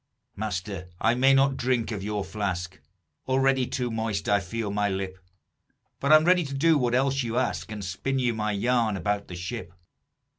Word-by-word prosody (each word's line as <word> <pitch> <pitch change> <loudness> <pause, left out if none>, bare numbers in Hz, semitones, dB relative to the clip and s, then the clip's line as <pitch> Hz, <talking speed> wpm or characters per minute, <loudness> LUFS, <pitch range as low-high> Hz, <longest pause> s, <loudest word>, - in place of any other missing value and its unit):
"Master, 95 -2 -4
I 110 - +3
may 135 +2 +4
not 135 0 +3
drink 120 -2 0
of 105 -3 -3
your 105 0 -2
flask, 95 -3 -3 0.5
Already 130 -1 +2
too 125 -2 -2
moist 110 -2 -2
I 100 0 +4
feel 105 +3 -4
my 105 0 +1
lip; 95 -1 -4 0.8
But 140 - +1
I'm 155 0 +7
ready 180 0 +4
to 140 -2 -5
do 160 +4 +4
what 125 -4 +1
else 135 +1 +2
you 120 -1 -2
ask, 125 -3 -1
And 105 -2 -5
spin 115 +9 -2
you 125 -2 +1
my 105 -1 -1
yarn 115 0 +1
about 100 +1 -1
the 90 - -7
ship. 90 +2 -6
115 Hz, 185 wpm, -26 LUFS, 100-130 Hz, 0.8 s, I'm